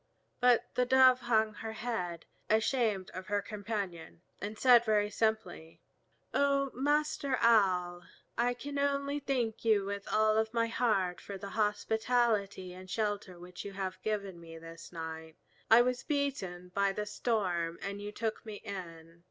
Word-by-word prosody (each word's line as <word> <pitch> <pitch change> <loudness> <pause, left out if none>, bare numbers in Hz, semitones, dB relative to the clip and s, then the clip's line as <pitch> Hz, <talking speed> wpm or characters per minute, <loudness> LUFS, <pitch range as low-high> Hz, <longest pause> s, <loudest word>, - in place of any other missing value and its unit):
But 245 -1 +3
the 250 - +2
Dove 260 0 +6
hung 220 -2 +2
her 220 +2 -6
head, 185 -8 -4 0.2
ashamed 220 -3 +1
of 185 +1 -8
her 205 -1 +1
companion, 200 -5 -5 0.2
and 210 +2 -5
said 245 -1 +7
very 210 -2 +2
simply: 215 -8 -2 0.5
"O 275 -1 +2
Master 290 0 +1
Owl, 185 -6 +3 0.3
I 245 +1 +1
can 280 +3 -5
only 280 0 0
thank 250 -6 -2
you 215 -3 +3
with 200 0 -5
all 215 0 +4
my 230 -1 +2
heart 215 -6 0
for 200 - -7
the 200 +1 -7
hospitality 210 -2 0
and 185 +1 -11
shelter 205 -2 -2
which 180 +1 -9
you 200 - -7
have 190 -1 -4
given 200 -4 -3
me 165 -1 -11
this 165 +1 -11
night. 160 -1 -7 0.3
I 230 +2 +8
was 250 0 -1
beaten 225 - -2
by 200 +1 +1
the 210 +1 -3
storm, 185 -7 -1
and 200 +1 -4
you 205 0 -5
took 220 +1 -3
me 215 -2 -7
in. 170 -5 -8
210 Hz, 150 wpm, -32 LUFS, 185-235 Hz, 0.5 s, I